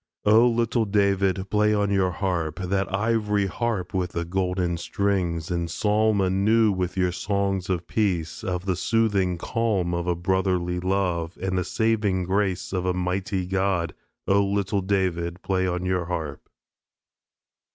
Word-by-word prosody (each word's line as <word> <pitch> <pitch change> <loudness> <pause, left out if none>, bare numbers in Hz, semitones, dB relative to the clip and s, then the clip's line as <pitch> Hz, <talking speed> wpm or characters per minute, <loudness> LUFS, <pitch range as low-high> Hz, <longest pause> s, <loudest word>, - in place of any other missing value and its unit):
O 110 +3 +6
Little 115 0 +1
David, 100 -2 +1
play 105 0 +3
on 100 -1 +1
your 95 -2 +2
harp, 85 -3 -2
That 95 +1 -1
ivory 105 0 +1
harp 100 -2 -2
with 90 -2 -1
the 85 0 -2
golden 90 -1 -1
strings; 90 -3 -1
And 85 -1 -1
psalm 105 +3 +2
anew 100 +3 +3 0.2
your 90 -1 +1
songs 95 0 -1
of 90 -2 -1
Peace, 90 -7 -1
Of 90 0 -3
the 95 -2 0
soothing 100 -3 +1
calm 100 -3 -1
of 85 0 -2
a 90 - +1
Brotherly 90 0 0
Love, 90 -3 -1
And 95 0 -2
the 90 - +1
saving 105 -3 0
grace 95 0 -1
of 90 -1 -1
a 90 - +1
Mighty 90 +1 -1
God. 95 -2 0 0.3
O 100 +1 +4
Little 100 0 0
David, 90 -2 -1
play 95 -1 0
on 90 0 -2
your 90 -2 0
harp. 80 -5 -5
95 Hz, 150 wpm, -25 LUFS, 90-100 Hz, 0.3 s, O